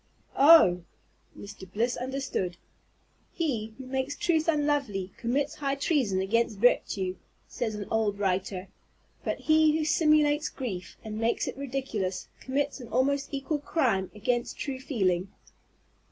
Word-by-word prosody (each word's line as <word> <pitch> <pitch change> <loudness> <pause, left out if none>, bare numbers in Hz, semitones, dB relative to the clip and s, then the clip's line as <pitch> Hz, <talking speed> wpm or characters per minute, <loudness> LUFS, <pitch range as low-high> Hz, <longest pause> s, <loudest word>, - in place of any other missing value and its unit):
"Oh!" 275 - +7 0.6
Mr. 200 -2 -10
Bliss 235 +5 0
understood. 255 -9 -3 0.7
"He 230 - -2
who 265 - -8
makes 265 +2 -2
truth 320 -2 +1
unlovely 290 - 0
commits 260 +5 -1
high 275 -1 -2
treason 270 - +1
against 220 +2 +1
virtue," 195 -4 +2 0.3
says 225 -3 -3
an 205 -1 -5
old 215 -2 +1
writer; 190 -1 -1 0.5
but - - -3
he 310 0 +4
who 310 - -1
simulates 305 -2 +3
grief, 195 -10 -6
and 215 -1 -5
makes 230 +1 0
it - - -4
ridiculous, 255 -9 -3
commits 280 +2 -2
an 245 - -9
almost 270 +4 0
equal 285 +2 -2
crime 245 - 0
against 240 +3 -1
true 270 -3 -4
feeling. 190 -9 0
250 Hz, 130 wpm, -28 LUFS, 200-285 Hz, 0.7 s, Oh